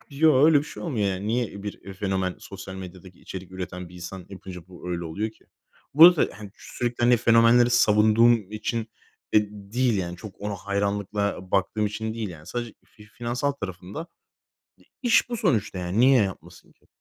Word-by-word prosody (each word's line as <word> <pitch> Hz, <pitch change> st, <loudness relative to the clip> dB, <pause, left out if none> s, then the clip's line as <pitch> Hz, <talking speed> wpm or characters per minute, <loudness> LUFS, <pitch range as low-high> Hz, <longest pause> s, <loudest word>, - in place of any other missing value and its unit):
Yoo, 145 Hz, -1 st, +4 dB
öyle 155 Hz, -1 st, +6 dB
bir 140 Hz, -, -1 dB
şey -, -, -9 dB
olmuyor, 115 Hz, -, -1 dB
yani. 95 Hz, +1 st, -3 dB
Niye 110 Hz, -3 st, -2 dB
bir 100 Hz, -1 st, -7 dB
fenomen, 95 Hz, -1 st, -1 dB
sosyal 95 Hz, -1 st, -9 dB
medyadaki 95 Hz, -1 st, -10 dB
içerik 95 Hz, -1 st, -9 dB
üreten 90 Hz, -1 st, -6 dB
bir 90 Hz, -, -16 dB
insan 90 Hz, +1 st, -8 dB
yapınca 95 Hz, -2 st, -10 dB
bu 90 Hz, 0 st, -9 dB
öyle 85 Hz, -1 st, -3 dB
oluyor 105 Hz, +7 st, -3 dB
ki? -, -, -26 dB, 0.5 s
Burada, 165 Hz, +2 st, +8 dB
hani, 105 Hz, -2 st, -9 dB
sürekli, 120 Hz, 0 st, -4 dB
hani, 120 Hz, 0 st, +5 dB
fenomenleri 115 Hz, +1 st, +5 dB
savunduğum 110 Hz, -2 st, +4 dB
için 110 Hz, +1 st, -2 dB, 0.5 s
de 105 Hz, -1 st, +4 dB
değil, 105 Hz, +2 st, -1 dB
yani, 85 Hz, -1 st, -4 dB
çok 100 Hz, 0 st, -11 dB
ona 105 Hz, 0 st, -3 dB
hayranlıkla 100 Hz, -1 st, -2 dB
baktığım 100 Hz, +3 st, +1 dB
için 110 Hz, +1 st, -4 dB
değil. 110 Hz, -3 st, -3 dB
Yani, 80 Hz, -3 st, -11 dB
sadece 120 Hz, +3 st, -5 dB
fi 105 Hz, -, -18 dB
finansal 120 Hz, +5 st, -2 dB
tarafında 100 Hz, -, -7 dB, 0.8 s
d -, -, -23 dB, 0.2 s
iş 240 Hz, 0 st, +4 dB
bu 240 Hz, -, -3 dB
sonuçta, 110 Hz, -, 0 dB
yani, 90 Hz, +4 st, -1 dB
niye 130 Hz, -2 st, +6 dB
yapmasın 95 Hz, -2 st, -7 dB
ki? -, -, -34 dB
105 Hz, 175 wpm, -25 LUFS, 95-120 Hz, 0.8 s, Burada